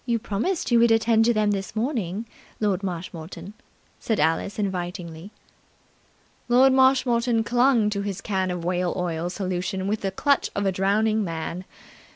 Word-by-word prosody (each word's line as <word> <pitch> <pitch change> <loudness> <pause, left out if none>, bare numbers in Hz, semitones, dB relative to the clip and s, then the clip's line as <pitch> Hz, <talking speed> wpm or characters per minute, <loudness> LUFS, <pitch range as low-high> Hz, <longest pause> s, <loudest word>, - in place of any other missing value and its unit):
"You 235 -2 0
promised 230 - -2
you 235 - +5
would 235 0 +5
attend 225 0 +3
to 240 - +3
them 210 -1 +2
this 195 0 -4
morning, 220 - -2 0.3
Lord 200 -3 0
Marshmoreton," 175 0 -6 0.5
said 220 -3 -1
Alice 165 +6 0
invitingly. 180 -3 -4 1.2
Lord 260 +2 +5
Marshmoreton 250 -3 +3
clung 240 -1 +3
to 200 -1 -2
his 200 -2 -4
can 190 -2 -1
of 180 -2 -4
whale 180 0 0
oil 175 -1 -2
solution 185 0 -3
with 210 +1 -1
the 195 - -1
clutch 280 +9 +1
of 200 - -1
a 195 - +2
drowning 215 +3 +1
man. 170 +1 -5
200 Hz, 155 wpm, -24 LUFS, 180-230 Hz, 1.2 s, you